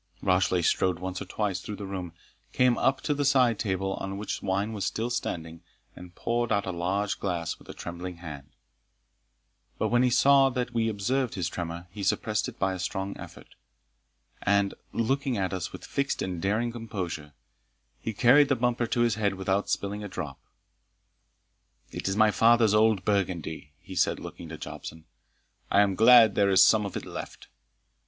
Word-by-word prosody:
Rashleigh 90 -1 +2
strode 90 +1 +2
once 95 +1 -5
or - - -4
twice 95 -1 -2
through 105 - -6
the 100 - -7
room, 95 -3 -5 0.4
came 125 -1 +4
up 135 0 +1
to 150 - 0
the 145 0 -1
side 130 -5 +3
table, 95 -2 -1
on 95 0 -4
which 105 0 -4
wine 100 +3 -1
was 100 -3 -4
still 115 +5 -2
standing, 80 -8 -4 0.3
and 90 -1 -12
poured 120 0 -1
out 100 -2 +1
a 95 - -2
large 95 +4 -1
glass 85 -4 -3
with - - -19
a - - -6
trembling 85 +1 -7
hand; 75 -5 -9 1.3
but - - 0
when 120 0 +3
he 125 - +4
saw 135 +2 +5
that 125 -1 -3
we 115 -1 +1
observed 120 +4 -1
his 90 -4 -1
tremor, 85 0 -5
he 100 - -8
suppressed 105 +2 0
it - - -13
by 95 -1 0
a 95 - -6
strong 95 +2 -3
effort, - - -12 0.9
and, 100 -1 +2 0.2
looking 130 +1 0
at 95 -1 -1
us 90 -1 -3
with - - -9
fixed 140 -1 -1
and 90 -3 -4
daring 110 +5 0
composure, 95 -10 -5 0.8
carried 135 +5 +6
the 135 - +3
bumper 120 -1 0
to 120 - 0
his 120 -1 +3
head 100 -2 +1
without 95 +1 -1
spilling 100 +1 -2
a - - -4
drop. 75 -8 -6 1.5
"It - - -4
is 95 +1 -1
my 110 -1 +5
father's 115 -1 +4
old 105 -3 +3
burgundy," 85 -7 -2
he - - -11
said, - - +1
looking - - -9
to - - -7
Jobson; 80 0 -8 0.6
"I 100 - +5
am 100 -1 +2
glad 115 +1 +7
there 100 0 +3
is 95 - +7
some 105 -2 +4
of - - -5
it - - -6
left. - - -8
100 Hz, 180 wpm, -27 LUFS, 90-115 Hz, 1.5 s, glad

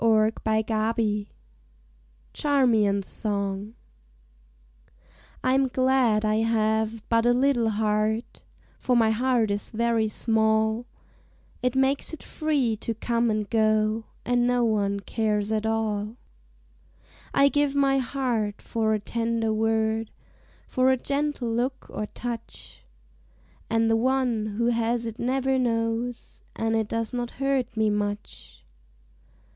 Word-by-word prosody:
Vigils 220 -1 +1 1.1
CHARMIAN'S 225 -9 +2
SONG 200 +1 -3 1.7
Fm 265 0 +2
glad 255 -5 +2
I 215 0 +2
have 220 0 0
but 230 0 +2
a 245 - +5
little 250 -3 +2
heart 215 +1 -1 0.2
— - - -33
For 250 - +1
my 225 -2 +4
heart 235 -2 +1
is 205 0 -2
very 230 -1 +1
small 220 +1 +1 0.4
— - - -33
It 250 0 0
makes 270 +3 +3
it - - -14
free 285 -8 0
to 225 +1 -4
come 235 +1 0
and 215 -1 -1
go 215 0 +1 0.2
And 245 0 +2
no 245 0 +2
one 200 -3 0
cares 210 0 -1
at 220 0 0
all. 215 -1 -1 1.2
I 280 - +5
give 290 0 +1
my 275 -1 +3
heart 240 -6 -2
for 220 -1 0
a - - -2
tender 230 +1 -1
word, 220 0 0 0.6
For 255 0 +2
a 260 - +2
gentle 280 -1 -2
look 250 +3 -2
or 210 - -4
touch, 235 0 -8 0.9
And 225 0 +2
the 225 - +3
one 245 -2 +1
who 235 +1 +2
has 235 0 0
it 225 0 -6
never 265 +1 +1
knows 230 0 -2
And 225 0 0
it 220 -1 0
does 230 +1 -3
not 245 -1 -2
hurt 270 -3 -1
me 220 -1 +2
much. 205 - -5
225 Hz, 125 wpm, -25 LUFS, 215-245 Hz, 1.7 s, a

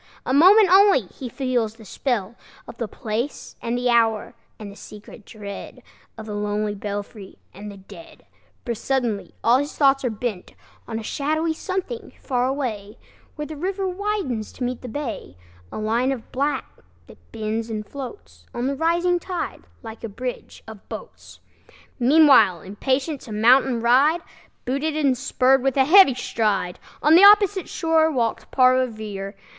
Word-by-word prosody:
A 255 - -1
moment 380 +8 +7
only 390 -6 +6
he 240 +6 -9
feels 245 -4 -2
the 225 -1 -15
spell 225 -2 -2 0.3
Of - - -11
the 230 - -2
place 225 +7 -5
and 235 +1 -2
the 245 0 +1
hour, 230 0 +1 0.2
and 210 -2 -9
the - - -13
secret 210 0 -13
dread 200 -2 -9 0.3
Of 220 - -8
the 215 - -6
lonely 210 0 -2
belfry 205 0 -7 0.2
and 205 +2 -9
the 200 - -12
dead; 190 -3 -15 0.4
For 240 - -1
suddenly 235 -3 -2
all 240 +3 +4
his 285 +1 -5
thoughts 275 -1 +3
are 250 - 0
bent 215 -4 -5 0.3
On 225 - -4
a 225 - -6
shadowy 310 +7 -1
something 380 +8 -5
far 250 -2 -1
away, 235 -6 -4 0.4
Where 300 - -5
the 310 - -8
river 380 +5 -3
widens 370 - -3
to 255 - -6
meet 245 0 -3
the 255 - -8
bay, 230 - -6 0.3
A - - -7
line 230 +5 0
of 250 -4 -6
black 285 +3 -1 0.4
that - - -19
bends 220 +1 -3
and 215 -1 -4
floats 85 - -10
On 240 - -2
the 275 +1 -1
rising 345 +3 +1
tide, 360 +1 -5 0.2
like 225 0 -10
a 230 - -4
bridge 250 +4 -7
of 220 -2 -12
boats. - - -10 0.6
Meanwhile, 250 - +5
impatient 265 - -2
to 225 - -11
mount 235 +5 +5
and 235 -3 -2
ride, 280 +8 +4 0.4
Booted 280 +5 -1
and 280 -4 +2
spurred, 260 +1 +2
with 270 +1 0
a 265 - +5
heavy 335 -4 +7
stride 210 -7 -1 0.2
On 300 - +5
the 350 +4 +7
opposite 405 -2 +6
shore 320 -1 +2
walked 240 -7 -2
Paul 255 -1 +5
Revere. 215 -5 -5
250 Hz, 165 wpm, -22 LUFS, 215-290 Hz, 0.6 s, moment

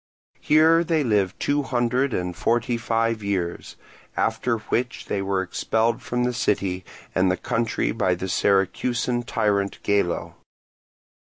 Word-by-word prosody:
Here 160 +2 +5
they 160 -2 +1
lived 105 -6 +1
two 145 0 +1
hundred 125 0 0
and 90 -4 -2
forty 120 +5 +1
five 115 -1 0
years; 95 -4 -3 0.4
after 120 -2 0
which 120 +3 -2
they 100 - -2
were 95 -1 0
expelled 110 +5 0
from 125 0 -1
the 125 0 0
city 95 -5 0 0.3
and 95 0 +3
the 90 - +1
country 115 - -1
by 90 +8 +1
the 90 +2 -5
Syracusan 120 +6 +1
tyrant 100 -4 0
Gelo. 100 -4 0
110 Hz, 135 wpm, -24 LUFS, 95-120 Hz, 0.4 s, Here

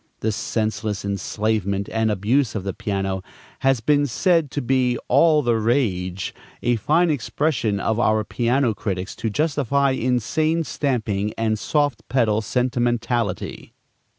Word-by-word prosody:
This 110 -1 0
senseless 110 -2 -2
enslavement 100 0 -1
and 110 0 +1
abuse 110 +5 +1
of 100 - -2
the 100 -1 -3
piano 95 -1 -2 0.4
has 135 -3 +2
been 145 +3 +3
said 165 - +2
to 145 - -3
be 125 -2 +1
"all 150 +3 +4
the 120 -2 +2
rage;" 100 -6 0 0.3
a 120 -1 +2
fine 160 - +2
expression 135 -6 0
of 110 +2 0
our 110 -2 +2
piano 120 +2 +1
critics 95 -2 -4
to 110 - -2
justify 140 +1 +1
insane 130 +7 0
stamping 110 -9 -1
and 110 -1 0
soft 145 -5 0
pedal 110 -4 +2
sentimentality. 120 -3 -1
115 Hz, 130 wpm, -22 LUFS, 105-140 Hz, 0.4 s, all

